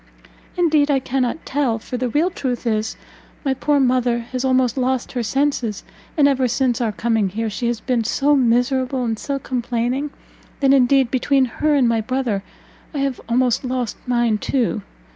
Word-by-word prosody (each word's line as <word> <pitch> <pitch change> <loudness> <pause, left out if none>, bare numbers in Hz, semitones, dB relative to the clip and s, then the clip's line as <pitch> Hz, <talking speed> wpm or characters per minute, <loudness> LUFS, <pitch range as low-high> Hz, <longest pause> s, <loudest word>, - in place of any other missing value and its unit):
"Indeed 310 -4 +3
I 280 - +3
cannot 260 +2 -2
tell; 265 -5 0
for 225 - -7
the 250 0 -1
real 320 +9 +1
truth 255 -6 -3
is, 220 -1 -1 0.5
my 270 - +2
poor 290 +2 +1
mother 250 -2 +2
has 255 0 -2
almost 260 -2 +2
lost 260 -1 -1
her 250 - -2
senses; 255 -3 -1 0.3
and 290 -2 +6
ever 265 -2 +2
since 245 0 0
our 225 -2 +1
coming 220 -2 0
here, 220 +3 -3
she 235 +3 -2
has 235 -1 -1
been 240 0 0
so 285 +6 +2
miserable 255 +1 +1
and 225 -2 -2
so 280 -1 -2
complaining, 250 +2 -2 0.5
that 275 -1 +4
indeed, 265 -1 +4
between 265 +1 +2
her 300 +4 0
and 265 -4 +4
my 230 -1 +1
brother, 245 -3 -1 0.5
I - - -1
have 275 -2 -1
almost 245 +1 +2
lost 250 -3 -2
mine 240 -3 +1
too! 240 -4 0
255 Hz, 175 wpm, -20 LUFS, 235-270 Hz, 0.5 s, and